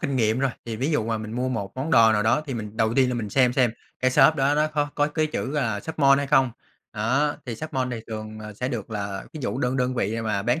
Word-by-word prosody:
kinh 140 -5 -1
nghiệm 110 -1 +2
rồi, 135 0 +1
thì 115 -1 -4
ví 135 +7 -1
dụ 150 -8 +1
mà 115 0 -1
mình 110 0 -6
mua 125 +2 -1
một 110 -6 -3
món 135 +5 -3
đồ 115 -7 +6
nào 105 - +2
đó, 120 +7 +3
thì 135 - -4
mình 105 -2 -6
đầu 110 0 +1
tiên 130 -2 +4
là 125 - -1
mình 110 -4 -3
xem 125 -2 +3
xem 125 -2 +3 0.3
cái 130 - +3
shop 155 - +6
đó 140 -1 +2
nó 150 +1 +3
có 150 -1 -1
có 145 0 +2
cái 155 +1 0
chữ, 150 -2 -4
ờ, 110 -7 0
Shop 160 +6 -7
Mall 140 -1 +6
hay 140 - -1
không. 135 -3 +4 0.4
Đó, 130 +8 +1
thì 120 - -3
Shop 155 +4 -7
Mall 130 -1 -1
thì 115 - -4
thường, 110 -1 -6
ờ, 110 0 -8
sẽ 125 +5 -3
được 115 -5 -5
là 100 -2 -4
ví 155 - -7
dụ 125 - -2
đơn 125 0 0
đơn 125 0 0
vị 115 -1 -1
mà 105 -3 -1
bán 120 +8 +1
125 Hz, 295 wpm, -24 LUFS, 110-140 Hz, 0.4 s, đồ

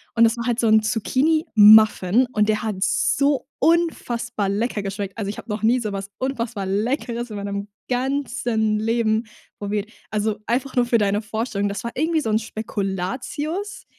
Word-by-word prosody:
Und 230 - +6
das 230 +1 +2
macht 235 - -3
halt 240 0 0
so 230 - +2
'n 220 0 +5
Zucchinimuffin 220 - +4
und 210 0 +2
der 215 0 +1
hat 215 -2 -2
so 280 +3 +1
unfassbar 240 - 0
lecker 210 +1 -1
geschmeckt. 200 +1 -5
Also 200 -2 -3
ich 210 - -5
habe - - -10
noch 210 +1 -3
nie 240 +3 +4
so 210 -3 -4
was 195 0 -5
unfassbar 235 -6 -3
Leckeres 235 +4 -2
in 210 - -5
meinem 200 0 -4 0.2
ganzen 245 -4 0
Leben 225 0 +1 0.3
probiert. 205 +1 -3 0.2
Also 215 0 -1
einfach 255 +3 -1
nur 245 -1 +3
für 240 -1 +3
deine 205 0 +1
Vorstellung, 210 -1 -2
das 200 -1 -5
war 235 - -3
irgendwie 320 +4 +1
so 225 - -3
'n 215 - +3
Spekulatius, 240 - -4
220 Hz, 170 wpm, -22 LUFS, 205-250 Hz, 0.3 s, Und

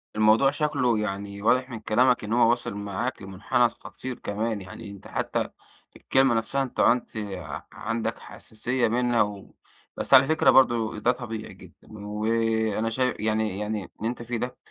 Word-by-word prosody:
الموضوع 110 +5 +5
شكله 140 -6 +1
يعني 100 -1 -4
واضح 125 +4 +2
من 115 -3 -6
كلامك 125 +4 +2
إن 105 +1 -3
هو 120 -1 +5
واصِل 120 -2 0
معاك 105 +5 -3
لمُنحنى 95 +5 +1
خطير 130 +2 -8
كمان، 105 +1 -2
يعني 100 +3 -9
أنت 100 -1 -12
حتى - - -2 0.5
الكلمة 135 -2 +2
نفسها 135 +5 0
أنت 130 - -7
عُنت 125 +1 +3 0.6
عندك 115 +1 -3
حساسيَّة 120 +3 -2
منها 120 +1 +2
و 100 -1 -3 0.4
بس - - +1
على 130 0 +9
فكرة 160 +3 +3
برضه 115 -4 +4
ده 120 - +3
طبيعي 115 -4 -6
جدًا - - -17
وأنا 110 +1 0
شاي 125 +2 0
يعني 110 -2 0
يعني 105 -1 -2 0.2
اللي 110 - -1
أنت 120 - -5
فيه 120 0 -3
ده 125 +2 -4
115 Hz, 160 wpm, -26 LUFS, 105-125 Hz, 0.6 s, على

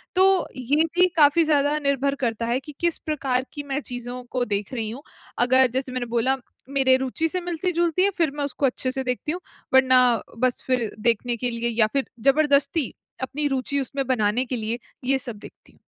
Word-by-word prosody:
तो 380 -1 +5
ये 275 +5 +2
भी 365 +1 +5
काफ़ी 300 +2 +5
ज़्यादा 295 -1 +2
निर्भर 280 -1 0
करता 230 -1 -1
है 240 +2 0
कि, 300 +3 -11
किस 340 -1 +1
प्रकार 265 -4 -2
की 290 - -5
मैं 280 0 -3
चीज़ों 245 -1 -6
को 250 -1 -1
देख 205 +3 -3
रही 225 -3 -2
हूँ। 250 +6 -8 0.4
अगर 260 +1 +6
जैसे 260 +1 -2
मैंने 255 -1 -2
बोला 240 +3 +1 0.3
मेरे 270 -2 +4
रुचि 265 +5 -1
से 365 +3 -2
मिलती-जुलती 345 0 0
है 400 - +4
फिर 330 -5 +2
मैं 290 - -3
उसको 285 0 -2
अच्छे 255 0 0
से 265 0 -2
देखती 250 +4 -2
हूँ, 355 +3 -4 0.3
वरना 255 -3 +5 0.2
बस 255 0 +1
फिर 250 -4 0
देखने 235 +1 +1
के 245 +1 -1
लिए 235 0 -1
या 215 - +6
फिर 275 -1 +1 0.2
जबरदस्ती 285 0 +2 0.3
अपनी 285 +3 -2
रुचि 275 +1 -1
उसमें 275 +1 -3
बनाने 240 -1 +1
के 255 - -4
लिए, 225 +2 -3 0.3
ये 270 +1 +3
सब 250 -4 -7
देखती - - -15
हूँ। - - -28
265 Hz, 200 wpm, -23 LUFS, 245-290 Hz, 0.4 s, अगर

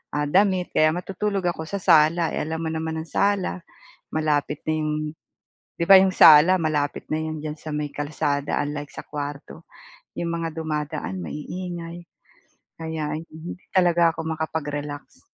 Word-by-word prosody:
ah, 145 0 0
damit 190 -2 +3
kaya 155 - +5
matutulog 195 +2 -2
ako 165 - -7
sa 200 - -1
sala. 165 +1 +6
Eh, - - -1
alam 160 +1 -3
mo 160 - -1
naman 160 0 -3
ang 160 - -11
sala, 200 -2 +2 0.6
malapit 150 -2 0
na 155 - +1
'yong 155 -1 -1 0.8
'di - - 0
ba, 195 - +11
'yong 190 0 +3
sala, 155 +3 +8
malapit 150 -4 -1
na 155 - +1
'yon 155 -1 -4
diyan 150 -1 -4
sa 155 - -8
may 150 -1 -3
kalsada 145 -1 -1
unlike 145 0 -5
sa - - -7
kwarto. 145 +2 -7 0.5
'Yong 170 - -2
mga 165 0 -2
dumadaan 150 - -3
maiingay 175 - -6 0.8
kaya 155 -2 -3
hindi 160 +2 -8 0.2
talaga 175 -3 +4
ako - - -10
makapag-relax. 145 -2 -5
160 Hz, 150 wpm, -24 LUFS, 150-170 Hz, 0.8 s, ba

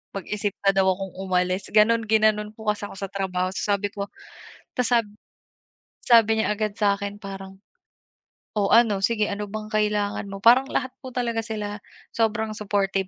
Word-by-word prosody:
Mag-isip 205 +1 -3
na 195 - +5
daw 190 - +4
akong 190 0 -7
umalis" 185 0 0
ganon, 225 +2 +4
ginanon 215 -1 +2
po 220 -1 -3
kasi 210 -1 -1
ako - - -11
sa 195 -1 -4
trabaho 185 -2 -1
ta's - - -3
sabi 205 0 0
ko, 200 -1 -3 0.7
ta's 250 -1 +1
sab 230 - +3 1.0
sabi 225 -2 +5
niya - - 0
agad 210 -1 -2
sa'kin 200 -1 0
parang, 195 -1 -8 1.0
"Oh, 200 - +1
ano 225 -4 +4
sige 215 -3 0
ano 205 +1 -3
bang 215 0 -6
kailangan 210 -1 0
mo?" 195 - -6
Parang 250 +4 +6
lahat 255 -1 -1
po 260 - -7
talaga 235 -2 -1
sila 210 -2 -4 0.4
sobrang 220 -1 0
supportive 195 -2 0
210 Hz, 165 wpm, -24 LUFS, 195-220 Hz, 1.0 s, Parang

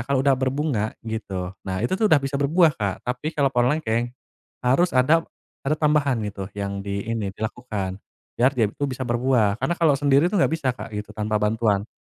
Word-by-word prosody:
kalau 140 -1 +1
udah 140 -1 +5
berbunga, 130 -4 -1 0.2
gitu, 95 -5 -4
nah 95 -1 -3
itu 120 - 0
tuh, 215 +1 +2
udah 155 - +7
bisa 135 0 -4
berbuah, 155 +3 +3
Kak. 100 -3 -1
Tapi 125 +3 -3
kalau 140 -1 +4
pohon 120 +2 +3
lengkeng, 120 -4 -1 0.5
harus 140 +8 +3
ada 155 +6 +4 0.4
ada 150 +3 0
tambahan, 150 -4 +2
gitu, 100 -1 -6
yang 100 0 -3
di 100 0 -4
ini, 115 -3 -2
dilakukan. 105 -4 -4 0.4
Biar 125 +3 +5
dia 115 -3 +3
itu 145 - -4
bisa 130 0 -5
berbuah. 120 -3 +2
Karena 175 - +1
kalau 160 -4 +4
sendiri 140 +2 +4
tuh, 205 - 0
nggak - - +2
bisa, 155 -5 -1
Kak, 115 - -8
gitu, 105 0 -5
tanpa 105 0 -1
bantuan. 105 -1 +1
125 Hz, 195 wpm, -23 LUFS, 105-140 Hz, 0.5 s, udah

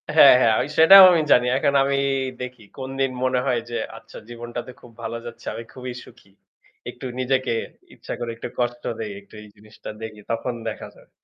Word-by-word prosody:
হ্যাঁ, - - +9
হ্যাঁ 115 -3 +4
আমি 130 - 0
সেটাও 190 +5 +10
আমি 170 -2 +3
জানি। 125 0 +5
এখন 140 +1 +1
আমি 140 0 0 0.4
দেখি 125 -2 -8
কোনদিন 135 0 -2
মনে 130 -1 +1
হয় 125 -3 +1
যে 120 - -3 0.2
আচ্ছা 115 - -14
জীবনটাতে 120 +1 -7
খুব 120 - -15
ভালো 115 +1 -4
যাচ্ছে। 115 -1 -10
আমি 115 - -7
খুবই 125 -1 -7
সুখী। 100 - -19 0.6
একটু 125 +2 -10
নিজেকে 130 0 0 0.4
ইচ্ছা - - -8
করে 120 - -4
একটু 115 - -7
কষ্ট 120 0 -2 0.2
দেই, 110 -2 -4
একটু 100 - -25
এই 105 - -13
জিনিসটা 105 +1 -13
দেখি 110 -2 -8
তখন 115 +2 -2 0.2
দেখা 110 - -8
যাবে। - - -21
120 Hz, 185 wpm, -22 LUFS, 115-130 Hz, 0.6 s, সেটাও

